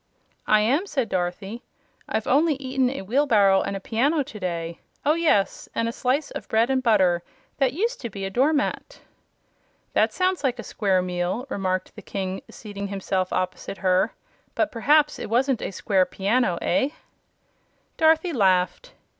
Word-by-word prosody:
"I 215 0 +5
am," 280 - +1
said 265 - -1
Dorothy. 185 +5 -3 0.5
"I've 220 - -1
only 300 +3 +3
eaten 260 -1 0
a 270 -5 -5
wheelbarrow 210 -4 +3
and 200 - -3
a - - -6
piano 275 +10 +1
to 215 -4 -10
day 170 -3 -4 0.3
oh, 300 - +5
yes! 315 -12 +1
and 230 - 0
a - - -1
slice 265 +5 -1
of - - -7
bread 230 +3 +2
and 260 -1 +2
butter 190 -8 +3 0.4
that 265 -3 +2
used 455 - -1
to 235 - -4
be 195 -1 -5
a 195 - -4
door 265 +8 +3
mat." 315 - -2 0.9
"That - - +3
sounds 370 -2 0
like 250 -3 +1
a 235 - -6
square 195 -4 0
meal," 180 +6 -2
remarked 185 -4 -2
the - - -9
King, 190 -1 -4
seating 200 -2 -7
himself 190 -1 -2
opposite 185 +1 -3
her; 185 -1 +1 0.4
"but 310 - +1
perhaps 295 +5 +3
it - - -5
wasn't 250 +1 +1
a - - -3
square 195 -1 +1
piano. 200 -1 +1
Eh?" 260 +10 +2 1.1
Dorothy 320 +2 +3
laughed. 190 - +1
225 Hz, 165 wpm, -24 LUFS, 190-275 Hz, 1.1 s, I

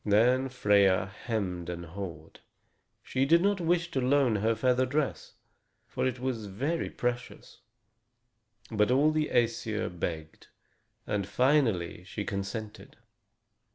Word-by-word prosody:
Then 125 +6 +3
Freia 100 -6 +3 0.2
hemmed 90 -7 -2
and 85 0 -5
hawed. 85 -2 -8 0.6
She 130 - 0
did 165 +5 +5
not 200 -2 +2
wish 170 0 +1
to 130 - 0
loan 130 -3 +3
her 110 +3 +1
feather 125 +3 +2
dress, 140 +2 -2 0.5
for - - -2
it 130 -1 -3
was 120 -5 -3
very 140 - -2
precious. 125 0 -4 1.1
But 105 0 +2
all 140 +5 +4
the 155 -1 0
Æsir 115 -2 0
begged; 80 -2 -5 0.6
and 100 -2 -2
finally 115 - +1
she 100 +2 -5
consented. 100 +2 -6
115 Hz, 120 wpm, -29 LUFS, 100-130 Hz, 1.1 s, did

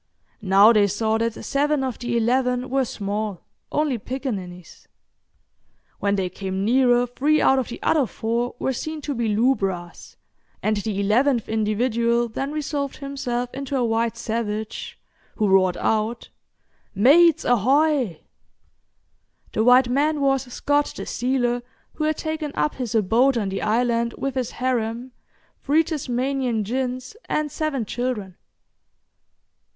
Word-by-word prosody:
Now 200 +3 +6
they 210 -2 +4
saw 220 +2 0
that 230 0 0
seven 290 0 +1
of 260 -3 -3
the 240 -1 -1
eleven 250 +2 +1
were 270 -1 +2
small, 205 -3 -4 0.3
only 295 -5 0
picaninnies. 200 - -6 1.1
When 200 0 +1
they 190 -2 0
came 190 +1 -4
nearer 245 +1 +4
three 285 +5 +1
out 265 - +4
of 255 - -2
the 240 - -7
other 290 -6 +2
four 235 +3 -2
were 265 - -1
seen 310 +5 -5
to 290 - -3
be 235 -3 -1
lubras, 195 -6 -1 0.5
and 215 0 +1
the 205 -1 -3
eleventh 235 +4 +2
individual 235 +2 +1
then 270 +5 -4
resolved 290 -2 -3
himself 250 -4 -4
into 275 0 -3
a 250 - +1
white 230 0 0
savage, 220 -2 -4 0.4
who 215 - +1
roared 190 -2 +3
out, 220 +2 -1 0.7
"Mates 315 - +5
ahoy!" 255 - +2 1.3
The 220 - +1
white 250 +2 +6
man 290 +4 +1
was 270 -2 +1
Scott, 290 +3 0
the - - -6
sealer, 245 -1 0 0.3
who 305 - -2
had 310 0 0
taken 315 -2 -3
up 290 - -1
is 235 -2 -3
abode 230 +5 +3
on 205 -4 -1
the 195 0 -3
island 235 +1 +1
with 275 -1 -2
his 255 -2 -2
harem, 245 -1 -2 0.5
three 305 +3 +3
Tasmanian 260 -5 -1
gins 255 - -3
and 305 -1 -1
seven 280 -7 -2
children. 215 -5 -3
245 Hz, 135 wpm, -23 LUFS, 220-270 Hz, 1.3 s, Now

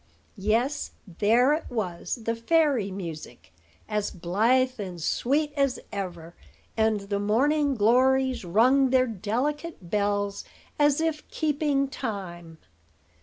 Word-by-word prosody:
Yes, 235 +8 0 0.3
there 240 +7 +4
it 315 - -2
was, 215 0 -3
the 230 +1 -1
fairy 270 -3 +2
music, 165 - -8 0.3
as 210 -1 -1
blithe 230 +9 +1
and 185 -4 -6
sweet 290 - 0
as 275 -3 +1
ever; 175 -4 -6 0.4
and 220 -2 +1
the 200 0 -3
morning 275 +7 +2
glories 255 +3 +3
rung 250 +9 +4
their 255 0 +4
delicate 240 - -3
bells 205 -1 0 0.4
as 290 +1 +3
if 320 -2 -2
keeping 295 -2 0
time. 180 -10 -6
230 Hz, 115 wpm, -26 LUFS, 200-275 Hz, 0.4 s, there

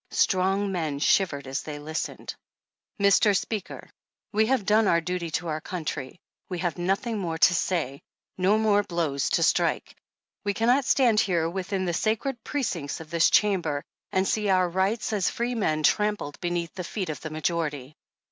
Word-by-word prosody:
Strong 195 +1 +1
men 160 -6 -2
shivered 145 -2 +2
as 135 +1 -3
they 150 -1 -7
listened. 155 +2 -5 0.7
Mr 200 0 +4
Speaker: 205 +2 -5 0.4
We 220 +1 +2
have 255 -5 +1
done 215 +1 +4
our 170 - +4
duty 175 0 -3
to 175 - -7
our 155 0 -2
country; 160 -4 -5 0.3
we 180 - -3
have 175 0 -2
nothing 200 +5 -1
more 165 -4 -3
to 175 - +5
say, 160 -6 -1 0.3
no 190 +3 +3
more 215 -2 +3
blows 165 -7 -1
to - - +2
strike. - - +1 0.5
We 205 -1 -1
cannot 245 +4 +3
stand 240 -6 +4
here 170 -5 +1
with 185 +2 -5
in 190 -2 0
the 175 - -1
sacred 225 +6 -1
precincts 180 - -3
of 160 0 -11
this 170 -1 +4
Chamber, 175 -9 +2 0.3
and 190 0 +1
see 210 -2 0
our 185 -1 +3
rights 190 +6 0
as 200 -4 +1
freemen 225 -11 -1
trampled 210 -3 +1
beneath 175 -1 -2
the 185 - -5
feet 185 0 -4
of 155 - -5
the 155 - -5
majority. 155 -3 -2
180 Hz, 170 wpm, -26 LUFS, 160-210 Hz, 0.7 s, to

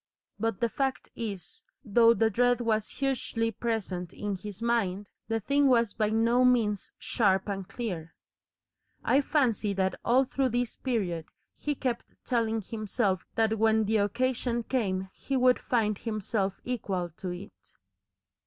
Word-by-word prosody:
But 225 -1 -1
the 235 - +4
fact 265 +4 -2
is, 200 -7 -6 0.2
though 230 +2 +5
the 225 -1 +2
dread 245 +3 +3
was 220 -3 0
hugely 250 -4 -1
present 190 -6 -3
in 205 -1 -3
his 200 +1 -8
mind, 205 -4 0 0.2
the 225 0 0
thing 280 +6 +3
was 235 -5 +3
by 215 -2 +1
no 230 +3 +3
means 225 -5 +2
sharp 195 -4 +1
and 195 -2 -3
clear. 180 -10 -5 0.9
I 275 - +4
fancy 235 -8 +1
that 190 -1 +1
all 250 +3 +4
through 265 0 0
this 245 0 -1
period 190 -11 -2 0.3
he 295 -1 -3
kept 250 -3 -3
telling 225 -3 +1
himself 210 -2 -1
that 220 -1 +2
when 220 0 +4
the 220 +2 +2
occasion 235 +3 0
came 190 -7 -1
he 270 - -2
would 250 0 +4
find 215 -4 0
himself 215 -3 -2
equal 190 -8 -2
to 185 - -4
it. 95 - -10
225 Hz, 145 wpm, -29 LUFS, 200-245 Hz, 0.9 s, though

